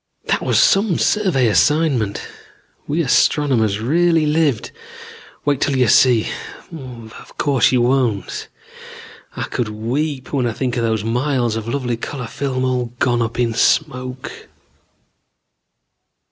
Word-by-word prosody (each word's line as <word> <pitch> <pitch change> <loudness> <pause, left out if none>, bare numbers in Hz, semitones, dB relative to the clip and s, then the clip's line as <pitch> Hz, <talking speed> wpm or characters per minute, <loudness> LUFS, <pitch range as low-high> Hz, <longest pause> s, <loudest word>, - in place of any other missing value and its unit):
"That - - 0
was - - +1
some 195 -3 +3
survey 185 - +1
assignment. 130 -3 +1 0.6
We 160 +4 0
astronomers 125 -7 +2
really 165 +6 +2
lived. 150 -6 0 0.7
Wait 145 -2 +1
till 140 -2 +1
you 125 -2 +3
see 120 -2 +4 0.4
but 125 -8 -10
of - - -16
course 140 -3 +2
you 125 -2 +2
won't. 120 -5 0 0.9
I - - -3
could 120 -4 -3
weep 130 +7 -3
when 130 -4 +1
I 115 - -2
think 125 +1 -2
of 120 - -1
those 110 -2 0
miles 120 0 0
of 110 0 -5
lovely 125 -3 -2
color 125 +2 -6
film, 130 +2 -3
all 125 -1 0
gone 120 -2 +1
up 115 0 -3
in 120 -2 +1
smoke. 130 0 -1
130 Hz, 130 wpm, -19 LUFS, 115-145 Hz, 0.9 s, see